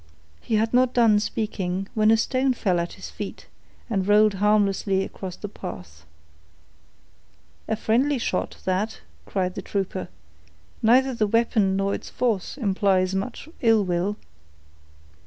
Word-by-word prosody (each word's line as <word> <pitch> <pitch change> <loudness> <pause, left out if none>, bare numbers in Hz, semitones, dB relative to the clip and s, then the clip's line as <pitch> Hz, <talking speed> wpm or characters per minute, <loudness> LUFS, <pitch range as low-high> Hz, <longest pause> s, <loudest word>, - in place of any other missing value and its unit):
He 220 - -1
had 220 +2 +1
not 255 0 +3
done 225 -4 +5
speaking, 195 -4 -3
when 215 -1 +3
a 225 - +6
stone 260 +3 +1
fell 185 -6 +1
at 170 0 -3
his - - -9
feet, - - -7 0.4
and 195 -5 -1
rolled 210 0 +5
harmlessly 200 -2 +2
across 185 -2 -7
the 205 - -6
path. 90 - -9 1.6
"A 220 - 0
friendly 255 +6 +1
shot, 210 -6 -2
that," 190 +4 -1 0.3
cried 185 -2 -1
the 195 - -5
trooper. 190 -1 -3 0.7
"Neither 255 +4 +4
the 220 -3 +1
weapon, 215 -3 +2
nor 195 +1 0
its - - -5
force, 230 -2 -1
implies 195 -5 +1
much 205 +9 -4
ill 225 -4 +4
will." 180 +3 -1
205 Hz, 140 wpm, -24 LUFS, 190-225 Hz, 1.6 s, a